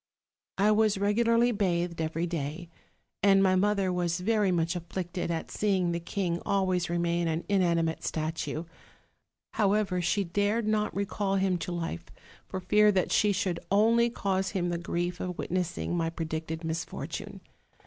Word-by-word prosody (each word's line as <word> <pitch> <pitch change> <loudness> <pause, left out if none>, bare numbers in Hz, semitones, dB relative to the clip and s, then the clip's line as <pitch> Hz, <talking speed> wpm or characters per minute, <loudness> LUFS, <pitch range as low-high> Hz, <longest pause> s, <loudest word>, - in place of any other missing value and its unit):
"I 205 +2 +4
was 215 -1 +3
regularly 230 +4 +3
bathed 175 -5 0
every 160 +2 -1
day, 165 0 -4 0.5
and 195 0 +5
my 185 -1 +4
mother 195 -1 +2
was 175 -1 0
very 210 0 +2
much 170 0 0
afflicted 175 +1 -4
at 165 -1 -3
seeing 190 -4 +1
the 170 - -1
king 175 0 -2
always 185 -3 +1
remain 170 0 0
an 160 +1 -2
inanimate 170 -5 +1
statue; 160 0 -3 0.9
however, 200 -3 +1
she 195 +4 +1
dared 205 +5 0
not 215 -1 +1
recall 200 0 -1
him 190 -2 +1
to 180 - -4
life, 165 - -4 0.4
for 190 - -4
fear 210 +3 +4
that 190 -2 0
she 210 - +4
should 185 -3 -1
only 230 +4 +4
cause 195 -4 -1
him 175 -1 0
the 170 -1 -2
grief 175 +1 -2
of 180 -1 -4
Witnessing 180 -1 -2
my 165 -1 0
predicted 160 0 -4
misfortune. 160 0 -5
180 Hz, 150 wpm, -29 LUFS, 170-200 Hz, 0.9 s, and